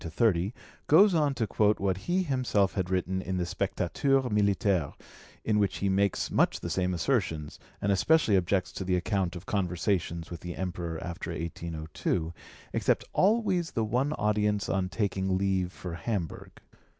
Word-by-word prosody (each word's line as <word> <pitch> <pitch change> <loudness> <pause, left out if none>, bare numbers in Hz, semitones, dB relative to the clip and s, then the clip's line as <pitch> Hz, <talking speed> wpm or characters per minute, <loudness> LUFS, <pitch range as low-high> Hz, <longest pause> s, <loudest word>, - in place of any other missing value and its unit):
29 80 -1 -8
30) 90 +5 -2 0.3
goes 190 +6 +7
on 150 -4 +2
to 115 - 0
quote 105 +1 +2
what 95 -1 +1
he 185 +2 +2
himself 125 - +1
had 95 -3 -2
written 95 0 0
in 95 0 -3
the 90 - 0
Spectateur 100 - 0
Militaire, 100 - +1 0.5
in 105 -1 +2
which 100 -2 +1
he 100 - 0
makes 100 0 +1
much - - +2
the - - -5
same 90 -1 0
assertions, 85 - -1 0.2
and 100 - 0
especially 110 +3 +3
objects 95 0 +1
to - - -5
the 90 0 +1
account 95 -1 -1
of 90 +1 -8
conversations 90 -3 -1
with 85 - -6
the 90 0 -6
Emperor 85 -3 -4
after 85 0 -5
1802, 80 0 -3 0.4
except - - +1
always 195 -5 +2
the 115 - 0
one 125 +7 0
audience 105 -3 +1
on 95 -1 0
taking 95 -2 0
leave 95 -2 0
for 90 -2 -7
Hamburg. 85 0 -4
95 Hz, 160 wpm, -29 LUFS, 90-105 Hz, 0.5 s, goes